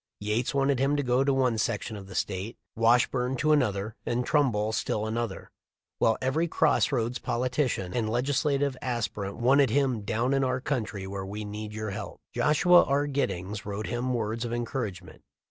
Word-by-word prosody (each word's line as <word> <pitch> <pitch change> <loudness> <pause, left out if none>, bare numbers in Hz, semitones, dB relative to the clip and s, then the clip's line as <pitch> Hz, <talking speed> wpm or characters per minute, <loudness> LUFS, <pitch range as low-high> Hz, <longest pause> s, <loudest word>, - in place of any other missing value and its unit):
Yates 105 +4 -1
wanted 135 -1 +2
him 140 +2 +2
to 145 - 0
go 125 +1 +2
to 140 - +2
one 130 -4 +2
section 110 0 -1
of 100 -2 -9
the 95 - -10
State, 100 +3 -3 0.2
Washburne 125 +3 +2
to 155 +4 +1
another, 110 -7 +1
and 120 +1 -1
Trumbull 115 -8 +2
still 110 -1 -1
another; 115 -2 -3 0.5
while 115 - +3
every 145 +6 0
cross 160 - +2
roads 120 -2 -1
politician 125 -6 -1
and 115 -3 0
legislative 135 +3 +1
aspirant 105 -5 -3
wanted 135 +2 +4
him 130 -3 +1
"down 115 +5 0
in 135 0 +2
our 130 0 0
country, 110 -8 -3
where 95 0 -5
we 105 +2 -5
need 105 +1 -6
your 110 -1 -4
help." 105 - -6
Joshua 175 +4 +5
R. 140 +1 +1
Giddings 105 -8 -2
wrote 100 +1 -4
him 125 +2 -1
words 115 0 -2
of 120 - -4
encouragement. 120 -5 -4
120 Hz, 175 wpm, -28 LUFS, 105-135 Hz, 0.5 s, Joshua